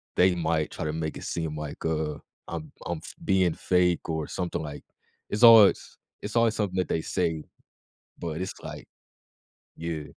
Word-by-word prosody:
they 90 +1 +5
might 80 -2 0
try - - -5
to 75 - -1
make 80 -1 -3
it - - -8
seem 80 -2 -3
like, 75 -1 -6
uh, 80 -2 -1 0.3
I'm 80 -3 -6
I'm 85 - -2
f - - -8
being 95 -2 +3
fake 90 -1 +1
or 80 -2 -2
something, 90 -2 -3
like 75 -1 -7 0.5
it's 105 +3 -1
always 115 -4 +7 0.2
it's 105 +2 -6
always 115 -1 +3
something 100 -3 -1
that 90 - +1
they 80 - 0
say, 80 -2 -1 0.8
but 85 0 -4
it's, 95 - -3
like - - -8 0.9
Yeah. 80 -2 -4
85 Hz, 170 wpm, -27 LUFS, 80-95 Hz, 0.9 s, always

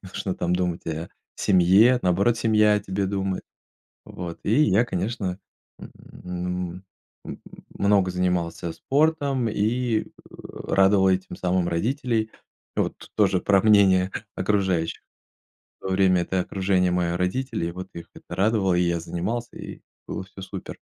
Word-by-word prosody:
не 95 - -10
нужно 95 - -3
там 90 +1 0
думать 90 -2 -2
о 80 +1 -4 0.3
семье, 100 +7 +5
наоборот, 100 +6 +2
семья 105 -2 +3
о 105 - +1
тебе 95 0 -2
думает. 95 -1 -2 0.6
Вот, 85 -2 -7
и 115 +9 +3
я, 105 +2 +3
конечно, 95 -2 -3 0.4
м, 90 0 -6 0.4
м - - -8 0.4
много 100 -2 +3
занимался 90 -2 -1
спортом 140 - +1
и, 110 +2 0
э, - - -17 0.4
радовал 95 0 +3
этим 95 0 -1
самым 90 -1 0
родителей. 115 - -1 0.4
И - - +2
вот - - -1 0.2
тоже - - +3
про 100 -2 +3
мнение 95 -3 +5 0.2
окружающих. 95 -4 0 0.8
В - - -7
то - - -2
время 95 -2 +3
это 95 +1 -1
окружение- 95 -1 +1
мои 90 -1 0
родители, 90 +4 -1
и 85 - -3
вот 95 +2 -7
их 85 - -8
это - - -10
радовало, 100 -2 +2
и 90 - +2
я 85 -1 0
занимался, 105 +9 -4
и - - -9 0.3
было - - -4
всё 95 0 -13
супер. 95 0 -7
95 Hz, 145 wpm, -24 LUFS, 90-105 Hz, 0.8 s, семье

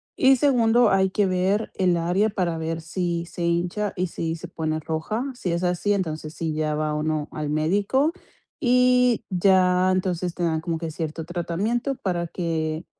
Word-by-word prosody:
y 265 0 +5
segundo, 240 -4 +4
hay 190 0 +3
que 205 +2 +1
ver 190 +3 0
el 180 -2 +2
área, 180 +6 +1
para 180 -5 -1
ver 160 0 -3
si 170 +1 -2
se 175 0 -6
hincha 175 +4 0
y 180 +1 0
si 165 -1 -3
se 170 +2 -8
pone 155 -2 -2
roja. 160 +9 -3
Si 185 -7 -3
es 170 +1 -1
así, 180 +3 +1
entonces, 155 -5 -3
sí, 160 -1 -3
ya 155 0 -1
va 150 0 -1
uno 155 0 -1
al 150 -1 -3
médico, 200 - +1 0.5
y 250 -2 +3
ya, 185 -1 +3
entonces, 180 -2 -1
te - - -7
dan 160 -2 0
como 165 -1 -2
que 165 -1 -4
cierto 160 0 -5
tratamiento, 190 - -2
para 175 -6 -2
que, 160 -1 -3
175 Hz, 175 wpm, -24 LUFS, 160-200 Hz, 0.5 s, y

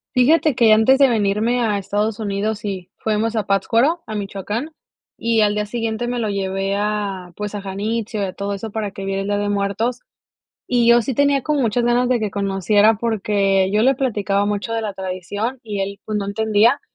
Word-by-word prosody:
Fíjate 295 +3 +4
que 225 -3 +5
antes 220 +5 +5
de 275 -1 +5
venirme 220 +2 +1
a 215 -3 +1
Estados 205 +2 -2
Unidos 210 0 -2
y 190 -3 -5
fuimos 220 +1 -1
a 215 - 0
Pátzcuaro, 230 - +2
a 215 - -5
Michoacán 205 - -4 0.5
y 230 -1 +1
al 205 -1 +3
día 210 0 -1
siguiente 230 +1 -2
me 245 0 -2
lo 220 -2 -1
llevé 195 0 -1
a, 200 -3 -2
pues 210 0 -5
a 205 - -4
Janitzio 210 +3 -3
y - - +1
a 185 - -5
todo 200 +1 -3
eso 210 +2 -6
para 210 -1 -3
que 195 0 -7
viera 195 0 -2
el 195 - -4
Día 205 0 0
de 205 0 -1
Muertos. 205 +5 -1 0.7
Y 240 -2 +2
yo 235 0 +6
sí 260 +4 -3
tenía 280 +2 +2
como 300 -2 0
muchas 235 0 +1
ganas 240 +1 +2
de 250 -1 +2
que 215 -2 -2
conociera, 200 +2 +2
porque, 200 -3 +1
yo 210 - +3
le 265 +2 +5
platicaba 205 -6 0
mucho 205 +2 -2
de 225 - -1
la 210 -2 -4
tradición 190 +6 -4
y 205 -3 -3
él, 200 +1 -4
pues 215 -1 -2
no 200 - -2
entendía, 220 +5 +2
210 Hz, 210 wpm, -20 LUFS, 200-230 Hz, 0.7 s, yo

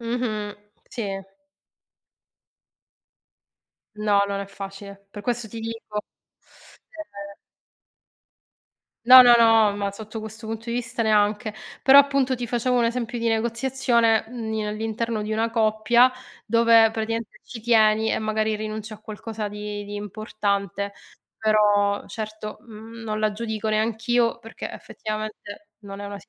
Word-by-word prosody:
Mh-mh, 230 -3 -3 0.3
sì. 195 -5 -4 2.7
No, 205 -1 +2
non 200 0 -3
è 200 - -5
facile. 195 0 -10
Per 205 0 -9
questo 240 0 -2
ti 225 +2 -8
dico, 225 -2 -5 0.9
ehm 200 -11 -10 1.7
No, 255 +1 +11
no, 245 -1 +7
no, 225 -3 +5
ma 200 -1 -2
sotto 215 +2 -8
questo 220 +1 -8
punto 225 +1 -5
di - - -2
vista 235 -1 -2
neanche. 215 0 +2 0.3
Però 270 +2 +8
appunto 275 -2 +3
ti 245 -1 -4
facevo 245 +2 0
un 235 - +3
esempio 240 0 -3
di 230 - 0
negoziazione, 235 0 +1
mhmm, 230 -2 -5
in 215 -1 -2
all'interno 220 +1 -3
di 210 - -4
una 225 +1 0
coppia, 225 +2 +3 0.4
dove 230 0 +5
praticamente 225 0 -4
ci 230 - -9
tieni 220 -1 +3
e - - 0
magari 215 0 -1
rinunci 215 0 -5
a 215 - -14
qualcosa 215 0 -6
di 210 0 -6
di 205 - -8
importante. 200 -1 -3 0.4
Però 205 -2 +2
certo, 215 -1 -6
mhmm, 225 0 -11
non 215 -1 -3
la 215 0 +2
giudico 220 0 -4
neanch'io 225 +2 +1
perché 225 - -8
effettivamente 215 -1 -7
non 200 -1 -9
è 205 - -5
una 200 0 -7
sit - - -19
220 Hz, 135 wpm, -24 LUFS, 210-230 Hz, 2.7 s, No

